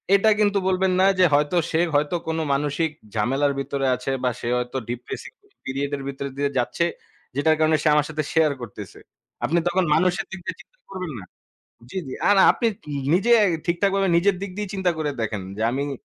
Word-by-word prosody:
এটা 220 +2 +4
কিন্তু 205 -1 +3
বলবেন 185 0 +2
না, 190 - +5
যে 180 - +7
হয়তো 150 +4 +2
সে 160 - +1 0.2
হয়তো 150 +4 +2
কোনো 160 0 -1
মানসিক 150 +3 0 0.2
ঝামেলার 135 +6 +1
ভিতরে 140 0 -2
আছে, 125 +2 -4
বা 125 - +3
সে - - -5
হয়তো 125 +2 -3
ডিপ্রেসিভ 120 - -6 0.3
পিরিয়ড 140 +2 -2
এর 135 - -8
ভিতর 140 0 -5
দিয়ে 140 0 +1
যাচ্ছে, 125 +7 +1 0.5
যেটার 155 +2 +3
কারণে 155 0 +4
সে - - 0
আমার 150 -1 +3
সাথে 155 -1 -2
শেয়ার 160 -2 +4
করতেছে। 105 -3 -9 0.5
আপনি 170 - +1
তখন 185 +1 +2
মানুষের 180 +4 +1
দিক 190 - -6
দিয়ে - - -4
চিন্তা - - -27
করবেন 185 -4 -5
না - - -9 0.7
জি, 190 - -3
জি। 130 - -6
আর 205 - +5 0.2
আপনি 235 - -1
ন - - -16 0.4
নিজে 230 +6 +3 0.3
ঠিকঠাকভাবে 195 +2 +1
নিজের 190 +2 +3
দিক 200 - -4
দিয়েই 205 -2 -4
চিন্তা 190 -2 +1
করে 150 -2 -1
দেখেন, 105 -3 -2
যে 110 - -3
আমি 140 +1 -2
155 Hz, 195 wpm, -23 LUFS, 140-185 Hz, 0.7 s, যে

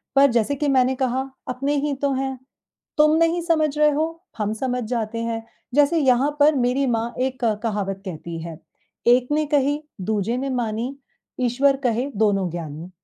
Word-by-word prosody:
पर 275 -1 +6
जैसे 235 +4 +1
कि 290 +1 -1
मैंने 260 -1 +3
कहा, 260 +1 -1 0.2
अपने 275 +3 -1
ही 295 -1 0
तो 280 -1 +1
हैं, 265 0 -2 0.6
तुम 305 +1 +5
नहीं 330 +1 +2
समझ 310 -3 +1
रहे 300 0 +5
हो, 300 +2 +1 0.3
हम 210 0 -1
समझ 250 +2 -2
जाते 230 -1 -2
हैं, 230 -1 -3 0.3
जैसे 290 +3 +4
यहाँ 265 0 +3
पर 295 +1 +5
मेरी 255 +2 +1
माँ 230 +1 -2
एक 260 -2 -5 0.2
कहावत 200 -3 -2
कहती 170 -2 -6
है, 165 -2 -7 0.5
"एक 245 +1 +5
ने 305 +1 +2
कही 290 +1 +2 0.3
दूजे 220 +3 0
ने 270 +1 -2
मानी, 230 +4 -3 0.4
ईश्वर 265 +3 +2
कहे 240 +1 +1 0.2
दोनों 195 -3 +2
ज्ञानी," 165 0 -6
255 Hz, 170 wpm, -23 LUFS, 225-280 Hz, 0.6 s, पर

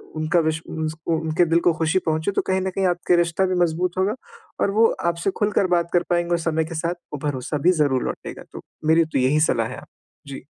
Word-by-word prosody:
उनका 155 +2 +1
विश 160 0 0
उन 160 -1 -3 0.3
उनके 160 +2 +1
दिल 165 +1 +3
को 175 - +3
ख़ुशी 165 +3 +2
पहुँचे 160 +4 0
तो - - 0
कहीं 190 0 +1
न 190 - -1
कहीं 195 -1 +1
आपके 175 0 +1
रिश्ता 170 +2 +1
भी 185 0 -1
मज़बूत 175 +2 -1
होगा 195 +4 +1 0.5
और 200 - +2
वो 225 - +7 0.3
आपसे 170 +3 -2
खुलकर 205 -2 +2
बात 170 0 0
कर 175 - +3
पाएँगे 175 0 +1
और 170 - +2
समय 160 0 0
के 165 +1 -7
साथ 170 +2 -1 0.2
वो 150 - -4
भरोसा 145 +1 -3
भी 180 - +7
ज़रूर 130 -3 +1
लौटेगा, - - -6
तो - - -8 0.3
मेरी 165 +1 +5
तो 145 -4 -2
यही 135 +4 +2
सलाह 120 -7 +2
है 130 - -8
आप - - -12 0.4
जी। 135 -1 -8
165 Hz, 230 wpm, -22 LUFS, 155-180 Hz, 0.5 s, वो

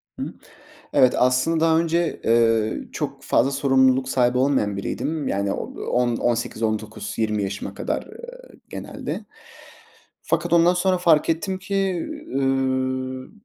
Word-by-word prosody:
Hı - - -5
hı. - - -6 0.6
Evet, 125 - +5
aslında, 130 +6 +2
daha 160 0 +4
önce, 170 0 0
eee, 115 -1 +2
çok - - -4
fazla 135 - +2
sorumluluk 130 -1 +3
sahibi 125 -1 +2
olmayan 130 -7 +1
biriydim. 145 +9 -3
Yani, 100 0 -1
o - - -3 0.2
on 120 -1 0
on 120 0 +1
sekiz, 115 -1 -5
19, 110 -1 -3
20 105 -2 0
yaşıma 100 +1 -4
kadar, - - -2
eee, - - -13
genelde. - - -6 1.0
Fakat 175 - -1
ondan 170 +1 +5
sonra 185 0 +1
fark 165 -4 +3
ettim 185 +4 -1
ki, 195 +1 -6 0.5
üüü, 130 -1 -1
130 Hz, 140 wpm, -23 LUFS, 115-165 Hz, 1.0 s, Evet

